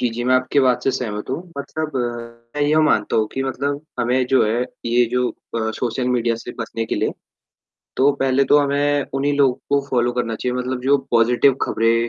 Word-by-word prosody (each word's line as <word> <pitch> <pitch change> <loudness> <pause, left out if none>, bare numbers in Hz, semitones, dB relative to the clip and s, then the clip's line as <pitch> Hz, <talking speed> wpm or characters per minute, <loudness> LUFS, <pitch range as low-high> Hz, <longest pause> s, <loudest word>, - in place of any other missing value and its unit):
जी, 125 - +2
जी, 115 +1 -4
मैं 130 - +3
आपकी 130 +2 +2
बात 130 -2 +2
से - - +3
सहमत 110 -5 -4
हूँ, 130 - -1 0.2
मतलब 155 +1 -4 0.6
मैं 145 - +1
ये 150 +2 +2
मानता 110 -8 +2
हूँ 110 - +2
कि 135 - -2
मतलब, 140 +2 -2 0.2
हमें 125 +2 +1
जो 130 +1 +3
है 115 +3 0 0.2
ये 120 +1 +3
जो 125 0 +1
अ, 110 -1 -4
सोशल 125 +1 -1
मीडिया 120 -2 +1
से 120 +1 -8
बचने 115 0 -3
के - - -2
लिए, - - 0 0.9
तो 135 +2 +4
पहले 135 0 +3
तो 145 - +5
हमें 145 0 +1
उन्ही 140 +2 +1
लोग 140 -3 +2
को 140 0 +3
फॉलो 120 -1 +1
करना 120 -2 -2
चाहिए, 125 +3 -2
मतलब 125 0 -3
जो 140 +2 +3
पॉजिटिव 120 +3 +4
खबरें 115 +1 +1
125 Hz, 205 wpm, -20 LUFS, 120-140 Hz, 0.9 s, तो